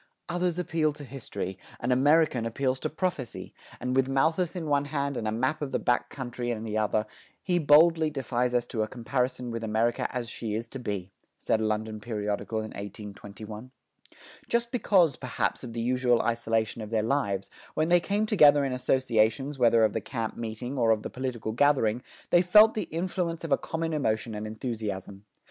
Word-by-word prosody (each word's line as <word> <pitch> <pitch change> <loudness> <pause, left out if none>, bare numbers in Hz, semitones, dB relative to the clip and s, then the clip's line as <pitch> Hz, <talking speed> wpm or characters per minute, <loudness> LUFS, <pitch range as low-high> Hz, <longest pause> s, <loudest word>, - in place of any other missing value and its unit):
"Others 175 0 0
appeal 160 -3 0
to 150 0 -10
history: 115 -8 -6 0.2
an 120 - -1
American 145 0 +4
appeals 130 +2 -1
to - - -2
prophecy; 155 -7 -3 0.3
and 125 +1 -2
with 135 0 +2
Malthus 160 +6 +1
in 175 -3 -4
one 145 -1 +2
hand 140 -1 -2
and 110 - -2
a - - 0
map 130 +8 -1
of 145 - -2
the - - 0
back 120 - 0
country 120 -2 -5
in 110 -2 -2
the 110 -1 -4
other, 110 0 +1 0.4
he 180 -2 +1
boldly 160 +1 +5
defies 125 -3 -1
us 120 -1 +2
to 115 -2 -3
a 110 - 0
comparison 125 +1 -2
with 115 0 -4
America 110 +2 +1
as 125 -2 -3
she 110 -2 -4
is 115 +2 -3
to 135 - -7
be," 100 -5 -4 0.3
said 110 - 0
a - - +1
London 110 0 -2
periodical 105 0 -3
in 110 - -7
1821. 105 +3 -8 0.8
Just 235 0 0
because, 185 - +3
perhaps, 120 -6 -2
of 120 -2 -7
the 115 - -4
usual 125 0 +2
isolation 115 -1 0
of 105 - -6
their 110 -1 +1
lives, 100 -6 -1 0.2
when 155 +1 +1
they 175 0 +6
came 205 +4 0
together 150 -9 +6
in 135 - -1
associations 130 +2 +1
whether 115 -2 +5
of 110 - +3
the - - -1
camp 115 -4 -4
meeting 120 +4 -5
or 115 -2 +3
of 110 -1 +2
the - - -5
political 125 -4 -3
gathering, 120 -2 +2 0.3
they 175 - +6
felt 210 +5 +7
the 215 - -2
influence 170 0 -2
of 165 - -5
a - - +7
common 165 0 -3
emotion 110 -6 -1
and 105 +1 -4
enthusiasm. 105 -3 -5
125 Hz, 190 wpm, -28 LUFS, 110-150 Hz, 0.8 s, felt